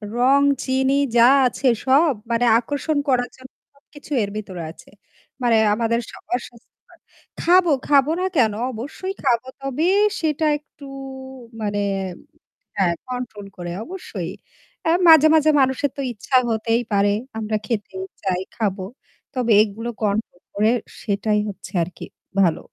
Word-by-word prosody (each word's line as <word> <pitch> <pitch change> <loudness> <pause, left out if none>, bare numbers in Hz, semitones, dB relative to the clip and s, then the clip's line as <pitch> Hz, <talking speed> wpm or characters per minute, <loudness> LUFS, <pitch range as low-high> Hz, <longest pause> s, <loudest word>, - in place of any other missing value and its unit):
রং 265 +3 +4 0.2
চিনি 265 +1 +1 0.2
যা 235 - +7 0.2
আছে 260 +2 -2 0.2
সব 280 +3 +4 0.2
মানে 235 +1 +2
আকর্ষণ 285 +4 -2
করার 245 -1 +2
জন্য 260 0 -14 0.2
সবকিছু 290 +1 -17
এর 200 - -3
ভিতরে 185 -5 -6
আছে। - - -17 0.5
মানে 235 -2 +4 0.2
আমাদের 230 +1 0
স - - -10 0.2
অসসস্থ্যকর। 240 -1 -8 0.4
খাবো, 350 -1 +4 0.2
খাবো 285 0 +4
না 370 - 0
কেন? 225 -6 +3 0.2
অবশ্যই 290 - -6
খাবো। 240 +2 +1
তবে 275 +4 -1 0.4
সেটা 315 -1 0
একটু 290 -1 -16 0.8
মানে 205 -1 -1 1.0
হ্যাঁ, 175 -3 +2
কন্ট্রোল 245 -5 -6
করে 175 -1 -6
অবশ্যই। 375 +5 -6 0.5
আ 325 - +3 0.2
মাঝে, 315 -1 +9
মাঝে 310 -1 +5
মানুষের 265 +1 +1
তো - - -4
ইচ্ছা 240 +4 -1
হতেই 225 +1 +1
পারে। 200 0 +3 0.3
আমরা 215 0 -1
খেতেই 200 -4 -3 0.2
চাই, 185 -2 0 0.2
খাবো। 200 -4 -1 0.5
তবে 245 -3 +1
এগুলো 220 +3 -4
control 205 -3 -1
করে 215 +2 +3 0.3
সেটাই 210 +1 0
হচ্ছে 200 - -9
আরকি 180 +2 -7 0.4
ভালো। 170 -4 +3
240 Hz, 135 wpm, -21 LUFS, 210-280 Hz, 1.0 s, মাঝে